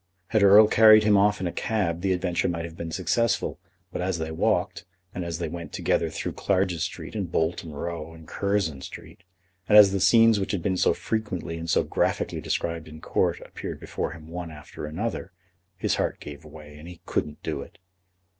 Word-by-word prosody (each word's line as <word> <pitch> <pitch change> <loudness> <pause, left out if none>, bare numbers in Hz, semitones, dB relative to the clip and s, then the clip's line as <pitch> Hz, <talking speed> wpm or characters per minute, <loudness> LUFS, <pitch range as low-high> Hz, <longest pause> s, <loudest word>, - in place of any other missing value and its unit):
Had 110 - +2
Erle 100 +2 +8
carried 110 0 +7
him 105 -1 +4
off 105 +1 +3
in 95 - -3
a 85 - -1
cab 85 -7 -1
the 95 0 +1
adventure 90 -1 0
might 85 -1 -3
have 85 -1 -9
been 85 -1 -6
successful; 95 +7 0 0.3
but - - -4
as 90 -1 -1
they 80 -1 -4
walked, 95 +3 0 0.3
and 90 - -4
as 85 -1 -4
they 85 -1 -3
went 85 +1 -7
together 85 - 0
through 80 - -4
Clarges 95 -4 0
Street - - -5
and 100 -6 -4
Bolton 80 0 -1
Row 80 +1 -5
and 80 -1 -14
Curzon 100 -8 -1
Street, - - -10 0.5
and 105 - +7
as 100 -2 +9
the 100 - 0
scenes 115 +3 +5
which 95 - -2
had 90 -4 -2
been 95 -2 +1
so - - +2
frequently 105 -7 -3
and 85 0 -6
so - - +3
graphically - - -1
described 85 -1 -2
in 80 0 -11
Court - - 0
appeared - - -7
before - - -4
him 80 -1 -12
one 85 +1 -6
after 75 -1 -9
another, 95 +4 -4 0.4
his - - 0
heart - - -1
gave 75 +1 -9
way, 75 -1 -12
and 80 - -11
he 90 -1 -11
couldn't 75 0 -3
do - - -3
it. - - -12
85 Hz, 200 wpm, -26 LUFS, 80-100 Hz, 0.5 s, as